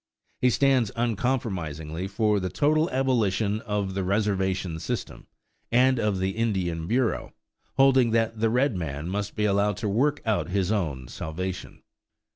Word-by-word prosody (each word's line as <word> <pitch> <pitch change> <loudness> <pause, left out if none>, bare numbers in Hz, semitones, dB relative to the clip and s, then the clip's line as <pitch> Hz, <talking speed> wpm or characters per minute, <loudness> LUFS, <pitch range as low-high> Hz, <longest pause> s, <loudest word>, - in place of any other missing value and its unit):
He 125 - +4
stands 130 -3 +3
uncompromisingly 95 - -2
for 105 +1 +1
the 95 -1 -2
total 155 - +2
abolition 110 -6 +1
of 105 -4 -2
the 95 0 -1
reservation 95 -3 0
system - - -5 0.4
and 130 +1 +4
of 105 -3 +1
the 95 +1 0
Indian 95 -7 -1
Bureau, 120 +2 0 0.4
holding 135 -3 +5
that 115 0 0
the 115 0 +2
red 125 +1 +2
man 75 -3 -4
must 100 +1 -3
be 105 - 0
allowed 100 -1 +2
to 110 - -2
work 130 +9 +1
out 110 -4 0
his 95 0 0
own 75 - -2
salvation. 90 +8 -6
105 Hz, 145 wpm, -26 LUFS, 95-120 Hz, 0.4 s, holding